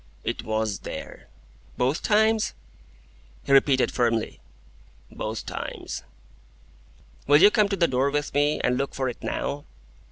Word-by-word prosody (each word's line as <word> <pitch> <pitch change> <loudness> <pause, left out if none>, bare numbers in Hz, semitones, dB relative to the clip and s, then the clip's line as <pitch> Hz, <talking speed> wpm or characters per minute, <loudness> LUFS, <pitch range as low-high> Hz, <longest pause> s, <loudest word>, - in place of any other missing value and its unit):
"It - - -3
WAS 110 -2 -1
there." - - -8 0.5
"Both 130 +5 0
times?" 220 +1 +2 0.9
He - - -4
repeated 135 -1 +4
firmly: 115 -3 0 0.7
"Both 110 +1 -5
times." - - -6 1.3
"Will 145 +1 +6
you 200 +4 +8
come 210 -2 +3
to 195 - 0
the 170 -3 +3
door 130 +2 +1
with 145 +1 -2
me, 145 +1 +2
and 125 +1 +1
look 140 - -3
for 130 -1 -1
it 120 - -8
now?" 145 +1 -3
140 Hz, 135 wpm, -25 LUFS, 125-165 Hz, 1.3 s, you